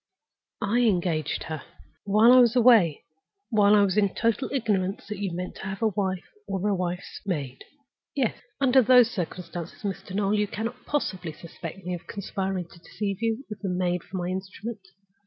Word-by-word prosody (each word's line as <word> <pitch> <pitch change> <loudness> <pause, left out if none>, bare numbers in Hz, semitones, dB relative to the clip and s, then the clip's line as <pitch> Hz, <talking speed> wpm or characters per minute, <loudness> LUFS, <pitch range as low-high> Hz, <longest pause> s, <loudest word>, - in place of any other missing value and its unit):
"I 210 +4 +2
engaged 175 -9 +1
her—" 155 -2 -5 0.4
"While 215 +4 +6
I 255 - +8
was 240 -1 +5
away? 225 - +5 0.5
While 210 -1 +5
I 205 - +6
was 195 0 +1
in 200 -2 +2
total 230 +3 0
ignorance 205 -7 0
that 210 -1 -6
you 200 -3 -2
meant 180 +2 -5
to - - -8
have 195 +3 -4
a 220 - +4
wife, 190 -2 -1 0.2
or 195 +1 -1
a 205 - +2
wife's 180 0 -3
maid?" 145 -10 -3 0.5
"Yes." 260 -6 +1 0.2
"Under 265 -1 +5
those 245 -1 +6
circumstances, 175 -2 -5
Mr. 195 -1 -4
Noel, 200 0 +1
you 210 -1 +2
cannot 230 +5 -5
possibly 185 - -2
suspect 170 +3 -9
me 180 - -2
of 175 - -7
conspiring 190 -2 -3
to 170 - -16
deceive 200 +3 -4
you, 230 +4 -1
with 210 -1 -7
the 195 - -2
maid 180 -1 0
for 190 - -7
my 175 0 -2
instrument. 195 +4 -5
195 Hz, 180 wpm, -26 LUFS, 180-220 Hz, 0.5 s, I